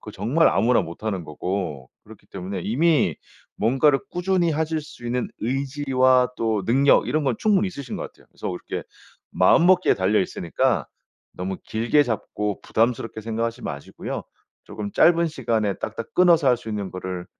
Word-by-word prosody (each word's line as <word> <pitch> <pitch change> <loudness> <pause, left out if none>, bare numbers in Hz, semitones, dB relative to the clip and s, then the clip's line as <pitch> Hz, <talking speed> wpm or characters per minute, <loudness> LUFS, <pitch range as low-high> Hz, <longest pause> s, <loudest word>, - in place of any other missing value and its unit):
그거 105 - -9
정말 120 - +2
아무나 115 +5 +3
못하는 95 +1 -4
거고 75 -4 -4
그렇기 - - -16
때문에 95 +1 -5
이미 150 - +2 0.4
뭔가를 135 +5 +3
꾸준히 180 -1 +1
하실 160 +1 -1
수 150 -5 -13
있는 125 +1 -1
의지와 130 0 +2
또 110 -4 -1
능력 135 +6 +4
이런 155 -1 0
건 130 -4 +1
충분히 205 -2 +2
있으신 140 -8 -7
것 - - -5
같아요. - - -13
그래서 - - -6
그렇게 90 - -5 0.5
마음먹기에 180 - +4
달려 95 +3 +2
있으니까 95 - -1 0.5
너무 95 +1 -4
길게 115 +7 +2
잡고 105 -3 -3
부담스럽게 115 -1 -1
생각하시지 115 +2 -3
마시고요. 70 0 -6 0.4
쪼금 105 -1 -6
짧은 170 +1 +4
시간에 110 -8 -1
딱딱 115 - -6
끊어서 170 -4 +5
할 125 - +4
수 115 - -11
있는 105 -3 -3
거를 90 -1 -5
115 Hz, 360 characters per minute, -23 LUFS, 100-145 Hz, 0.5 s, 끊어서